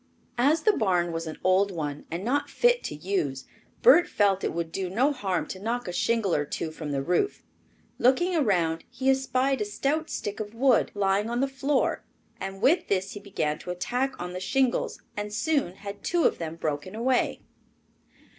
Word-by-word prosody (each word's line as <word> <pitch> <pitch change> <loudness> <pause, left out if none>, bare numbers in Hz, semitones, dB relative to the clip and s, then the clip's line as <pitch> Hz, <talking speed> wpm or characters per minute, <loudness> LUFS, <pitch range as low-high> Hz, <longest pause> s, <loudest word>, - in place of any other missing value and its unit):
As 300 +6 +3
the 430 - +5
barn 180 - +1
was 165 0 -4
an 155 - -6
old 185 +2 +4
one 150 -5 -4
and 170 +4 -4
not 285 +5 0
fit 485 0 +3
to - - -4
use, 150 -5 -2 0.4
Bert 405 -8 +7
felt 195 -2 +2
it - - 0
would 170 -1 -3
do 185 +1 -3
no 255 +10 +2
harm 195 -9 -1
to 185 - -6
knock 235 +3 -2
a 180 - -4
shingle 225 -2 +1
or 145 - +2
two 155 +2 -4
from 155 -2 -6
the 135 -1 -1
roof. 180 - 0 0.6
Looking 345 +9 +3
around, 175 - +1
he 265 0 +1
espied 265 0 +1
a - - +1
stout 280 +10 -1
stick 205 0 -4
of 215 +1 -6
wood 255 -1 +3
lying 200 +2 +1
on 240 +1 -1
the 275 - +2
floor 270 +1 0 0.4
and 195 +2 -6
with 325 +8 +4
this 195 0 0
he 205 - -7
began 155 -7 -2
an - - -8
attack 245 +9 -2
on 180 0 -5
the 180 - -4
shingles 255 +7 0
and 205 0 -4
soon 225 - 0
had 200 0 -8
two 345 -1 +1
of - - +2
them 165 -1 -4
broken 155 +4 -3
away. 250 +3 +1
205 Hz, 195 wpm, -27 LUFS, 180-265 Hz, 0.6 s, Bert